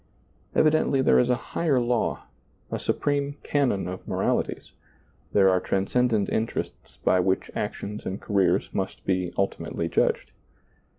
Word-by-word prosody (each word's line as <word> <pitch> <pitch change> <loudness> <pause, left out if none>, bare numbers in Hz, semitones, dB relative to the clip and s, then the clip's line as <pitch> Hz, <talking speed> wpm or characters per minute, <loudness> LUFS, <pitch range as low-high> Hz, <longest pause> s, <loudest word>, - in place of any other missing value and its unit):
Evidently 155 -3 +3
there 130 - +5
is 125 - +2
a 125 - +4 0.2
higher 150 -6 +2
law, 120 -1 0 0.5
a - - -2
supreme 145 0 -1
canon 125 -11 +1
of 90 0 -7
moralities; - - -1 0.6
there 100 -2 +5
are 95 -1 +4
transcendent 105 +3 +1
interests 110 +1 -3
by 95 - +4
which 95 +1 0
actions 105 +1 -4
and 95 - -4
careers 100 -2 +1
must 95 -1 -3
be 90 -2 0
ultimately 100 0 -1
judged. - - +1
105 Hz, 130 wpm, -26 LUFS, 95-130 Hz, 0.6 s, there